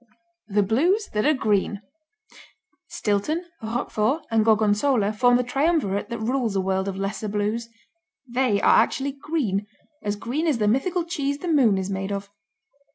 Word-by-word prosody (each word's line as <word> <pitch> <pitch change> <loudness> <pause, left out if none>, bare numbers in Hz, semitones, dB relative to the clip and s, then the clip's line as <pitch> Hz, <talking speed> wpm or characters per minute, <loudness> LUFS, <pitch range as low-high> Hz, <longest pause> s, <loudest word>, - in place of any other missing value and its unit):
The 205 -1 +2
Blues 340 - +1
that 210 +5 +1
Are 305 - +5
Green 210 -3 0 1.0
Stilton, 230 - -1 0.2
Roquefort 225 +4 -1
and 225 -1 +3
Gorgonzola 215 +1 +2
form 245 +3 +4
the 250 - 0
triumvirate 270 - 0
that 235 - -3
rules 230 -1 -1
a - - +2
world 190 0 -1
of 195 -1 -3
lesser 195 +2 -3
Blues. 210 +3 -2 0.6
They 245 -4 +1
are - - +6
actually 275 +1 -1
green, 270 - -2 0.3
as 205 -3 -2
green 260 +10 -2
as 295 -6 +2
the 210 -2 +1
mythical 335 - +1
cheese 285 -5 -2
the 355 - -6
moon 260 - +4
is 190 +1 -3
made 195 +1 -3
of. 200 0 -5
225 Hz, 160 wpm, -24 LUFS, 205-275 Hz, 1.0 s, are